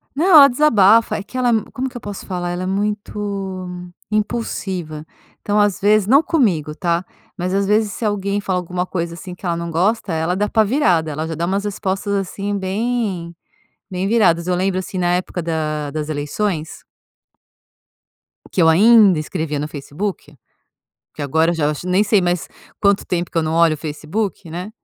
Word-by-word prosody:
Não, 310 +5 +1
ela 295 -5 +10
desabafa. 230 -5 +4
É 200 - -5
que 230 +6 -8
ela, 250 -1 +2 0.2
como 260 +1 -2
que 250 - -22
eu 245 - -6
posso 205 -1 -7
falar, 180 -2 -3
ela 175 +1 -3
é - - -3
muito 200 -1 -3 0.4
impulsiva. 190 -8 -3 0.3
Então, 205 0 0
às 205 -2 +2
vezes, 210 0 +3
não 275 +6 +6
comigo, 180 - 0
tá? 170 0 -1 0.3
Mas, 180 0 -2
às 200 0 +1
vezes, 210 0 +1
se - - -7
alguém 205 -1 -1
fala 190 -2 -1
alguma 180 0 -3
coisa 170 -2 -3
assim 180 +2 -8
que 180 - -12
ela 170 -1 0
não 170 0 -4
gosta, 190 +5 0
ela 160 +2 0
é - - -2
dá 205 +2 0
pá 220 - +3
virada, 185 - +1
ela 155 +2 -3
já 165 - -4
dá 165 +2 -2
umas 195 +3 -1
respostas 200 0 -2
assim 200 +1 -2
bem, 195 -3 -2 0.6
bem 185 0 -2
viradas. 180 -6 +3
Eu 180 - +1
lembro, 185 +1 0
assim, 185 0 -6
na 175 -1 +1
época 180 0 -2
da 155 -3 -2
das 155 0 -4
eleições… 155 +3 -3 1.7
que 185 - +1
eu 160 - +6
ainda 200 0 +6
escrevia 155 -2 -3
no 150 - -3
Facebook. 150 +2 -6 0.8
Porque 150 - -8
agora 160 +4 +2
eu - - -1
já 150 -2 +1
nem 185 +3 +2
sei 210 -1 +3
mais 175 -1 -1 0.3
quanto 200 -1 +3
tempo 175 -1 -2
que - - -11
eu - - +2
não 155 0 -2
olho 165 -1 +4
o - - -6
Facebook, 165 +6 -4
né. 180 +5 -5
185 Hz, 190 wpm, -19 LUFS, 170-205 Hz, 1.7 s, ela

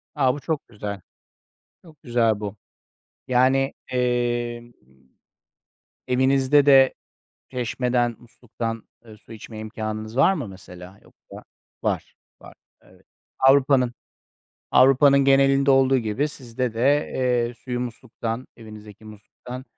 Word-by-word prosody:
A, 130 -4 +2
bu 145 - -6
çok 155 +2 -4
güzel. 100 -3 -7 0.8
Çok 160 -4 -19
güzel 115 -3 +1
bu. 105 -1 -6 0.7
Yani, 130 +2 +2
emm, 120 -1 -2 1.4
evinizde 130 +2 +3
de 135 -2 +6 0.6
çeşmeden, 125 -1 -1
musluktan, 115 -1 -7 0.2
eee, 110 -2 -14
su 110 - -16
içme 110 0 -10
imkânınız 110 +1 -6
var 140 +8 +4
mı 145 - -5
mesela? 95 0 -13
Yoksa - - -15 0.4
Var, - - -2 0.3
var. - - -13 0.3
Evet. - - -23 0.3
Avrupa'nın 135 -2 +4 0.8
Avrupa'nın 135 +2 +5
genelinde 135 0 +4
olduğu 135 0 +4
gibi 115 +5 -1
sizde 125 -4 -5
de, 140 +6 +1
eee, 125 -2 0
suyu 125 +1 -5
musluktan, 120 0 -6
evinizdeki 110 -2 -13
musluktan, 110 +4 -11
125 Hz, 110 wpm, -23 LUFS, 115-135 Hz, 1.4 s, de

